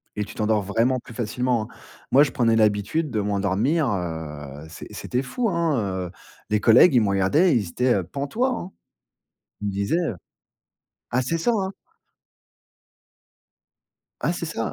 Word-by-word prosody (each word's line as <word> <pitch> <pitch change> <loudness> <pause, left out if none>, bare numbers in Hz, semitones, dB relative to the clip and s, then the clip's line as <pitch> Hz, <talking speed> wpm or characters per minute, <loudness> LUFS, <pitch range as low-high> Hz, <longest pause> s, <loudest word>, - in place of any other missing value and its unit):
et 105 - -1
tu 105 +2 -10
t'endors 110 -1 +1
vraiment 115 +6 +1
plus 120 - -12
facilement, 120 +1 -1
hein. - - -8 0.5
Moi, 140 +2 +8
je 145 - -1
prenais 115 -2 +2
l'habitude 110 +8 +1
de 110 - 0
m'endormir, 105 - +1
heu, 80 -6 -5
c'est 80 - -9
c'était 125 +2 -3
fou, 225 - -1
hein, 170 -5 +1 0.3
heu 90 - -8 0.4
les 105 0 +1
collègues, 120 +9 +7
ils 120 - +6
me 105 - +1
regardaient, 115 - +3
ils 105 -7 +1
étaient 120 +2 +1
pantois, 145 - -1
hein. 180 - -7 0.9
Ils 105 - -3
me 100 - -1
disaient, 100 - 0
heu 165 - -1 1.0
ah 125 - +1
c'est 165 +7 -1
ça, 165 - +1
hein! 195 -4 -1 2.5
Ah 150 +7 +1
c'est 170 -1 -4
ça. 115 -8 -3
115 Hz, 160 wpm, -24 LUFS, 100-150 Hz, 2.5 s, Moi